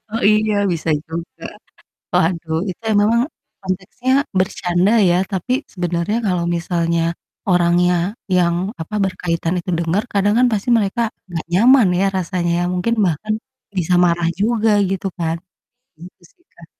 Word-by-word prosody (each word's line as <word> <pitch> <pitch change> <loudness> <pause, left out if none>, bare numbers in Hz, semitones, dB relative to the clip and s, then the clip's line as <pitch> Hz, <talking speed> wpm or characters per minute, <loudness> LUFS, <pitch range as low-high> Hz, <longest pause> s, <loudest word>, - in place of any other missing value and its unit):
Oh 230 - -2
iya, 215 0 +2 0.2
bisa 165 0 -4 0.2
juga. 165 +1 -7 0.7
Waduh, 165 -1 +1
itu 185 +6 -8 0.2
memang 230 +3 +3 0.4
konteksnya 190 +7 -3 0.3
bercanda 180 +1 +1 0.2
ya 175 - +3 0.2
tapi 195 +7 -1 0.2
sebenarnya 175 +3 -1
kalau 175 -2 0
misalnya 170 -1 0 0.5
orangnya 175 0 +3 0.4
yang 170 -1 +3 0.3
apa, 210 +6 -6
berkaitan 170 -2 -2
itu 180 - -7
denger, 170 +5 0
kadang 205 +1 +2
kan 250 - +5
pasti 215 +3 -1
mereka 210 +2 0 0.3
nggak 165 -2 -4
nyaman 235 +3 +5
ya 195 - +2
rasanya 175 -1 -1
ya, - - 0
mungkin 180 +6 0
bahkan 185 +6 -1 0.4
bisa 180 0 +1
marah 170 -1 +1
juga, 225 +1 +2 0.2
gitu 195 0 -2
kan. 165 0 0 0.6
Gitu 175 +3 -14
sih, 350 - -37
Kak. - - -15
180 Hz, 140 wpm, -19 LUFS, 170-210 Hz, 0.7 s, kan